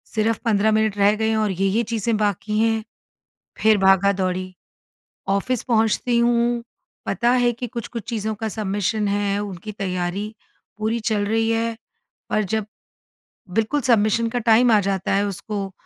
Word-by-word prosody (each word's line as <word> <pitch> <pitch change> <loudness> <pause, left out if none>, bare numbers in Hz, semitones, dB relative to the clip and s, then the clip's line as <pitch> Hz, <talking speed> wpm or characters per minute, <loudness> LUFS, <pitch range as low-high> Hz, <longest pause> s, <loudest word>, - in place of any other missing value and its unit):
सिर्फ 220 +1 +1
15 215 -1 +3
मिनट 215 -1 +1
रह 200 +1 +4
गए 220 +1 0
हैं, 220 - +1
और 215 -2 +1
ये-ये 195 +5 +1
चीज़ें 225 0 -1
बाकी 210 0 -1
हैं, 225 -1 +1 0.8
फिर 220 -1 +5
भागा-दौड़ी। 190 -1 +2 0.8
ऑफ़िस 200 +5 0
पहुँचती 235 0 +1
हूँ 235 0 +2 0.4
पता 240 0 +1
है 245 -1 +3
कि, 245 +2 -5
कुछ-कुछ 235 0 -6
चीज़ों 220 -2 -2
का 220 +1 -4
सबमिशन 205 0 -1
है 200 0 0
उनकी 200 +1 -7
तैयारी 195 +2 -3 0.4
पूरी 220 +2 -1
चल 215 -2 0
रही 225 +1 +1
है 230 0 0 0.5
पर 215 - +2
जब, 210 +1 -2 0.8
बिल्कुल 225 +9 0
सबमिशन 230 -1 +2
का 245 +1 -2
टाइम 235 +1 +4
आ 215 - +6
जाता 195 -1 -1
है, 200 +1 +2
उसको 200 0 -4
215 Hz, 150 wpm, -22 LUFS, 200-230 Hz, 0.8 s, आ